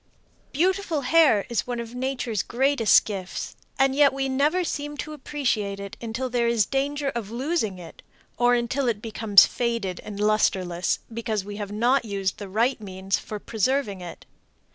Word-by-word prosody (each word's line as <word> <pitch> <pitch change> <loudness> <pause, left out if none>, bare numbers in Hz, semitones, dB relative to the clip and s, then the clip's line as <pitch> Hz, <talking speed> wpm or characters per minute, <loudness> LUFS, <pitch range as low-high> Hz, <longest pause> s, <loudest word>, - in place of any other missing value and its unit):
Beautiful 355 0 0
hair 275 -6 +4
is 235 0 -2
one 245 -1 -3
of 235 0 -6
nature's 250 -5 -2
greatest 255 0 +3
gifts, 190 -3 -5 0.2
and 270 0 +3
yet 285 -1 +5
we 270 0 -1
never 295 +7 +2
seem 295 -3 -4
to 305 - -5
appreciate 245 -9 -2
it 200 -1 -7
until 235 +3 -3
there 240 -1 0
is 230 -3 +3
danger 280 +1 -1
of 235 -6 -5
losing 240 - -1
it, 170 -2 -12 0.3
or 245 0 +3
until 245 +3 -1
it 225 -3 0
becomes 215 -2 +5
faded 230 -7 -2
and 205 -1 -8
lusterless 190 -4 +1 0.2
because 220 -3 -2
we 205 0 -7
have 205 -1 -5
not 240 +5 +2
used 195 -4 -3
the 200 -2 -7
right 230 +5 +1
means 190 -1 -2
for 215 - -6
preserving 220 -1 -1
it. 175 -1 -9
235 Hz, 165 wpm, -25 LUFS, 205-270 Hz, 0.3 s, yet